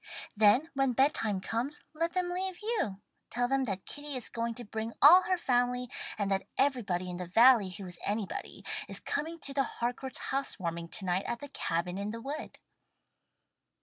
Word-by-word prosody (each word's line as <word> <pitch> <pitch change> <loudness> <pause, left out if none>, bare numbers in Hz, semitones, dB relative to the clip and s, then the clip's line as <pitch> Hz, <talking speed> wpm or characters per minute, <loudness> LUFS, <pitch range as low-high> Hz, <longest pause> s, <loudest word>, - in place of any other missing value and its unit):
Then 220 +10 +5
when 270 -2 +2
bedtime 225 -7 +2
comes 245 +9 -2
let 330 +2 -1
them 365 -1 0
leave 370 0 -2
you. 420 - -1 0.3
Tell 245 +1 0
them 270 +1 +1
that 195 -4 -4
Kitty 290 -1 -6
is 250 - -3
going 230 0 -2
to 240 - -6
bring 220 +2 -4
all 340 +6 +10
her 370 - +3
family, 250 -4 +1 0.3
and 200 -1 -1
that 195 0 0
everybody 220 -10 +1
in 180 -1 -5
the 180 -1 -5
valley 225 +1 +6
who 190 +1 -7
is 175 -1 -6
anybody 205 -1 -3 0.2
is - - -4
coming 320 +3 -3
to 275 - -3
the 275 - +2
Harcourt's 245 +1 -3
Housewarming 170 -11 -2
to 195 +3 -2
night 180 +2 0
at 235 - -2
the 285 - -8
'Cabin 180 -5 -2
in 200 +1 -3
the 230 +2 -5
Wood.'" 285 +6 -6
240 Hz, 180 wpm, -31 LUFS, 200-280 Hz, 0.3 s, all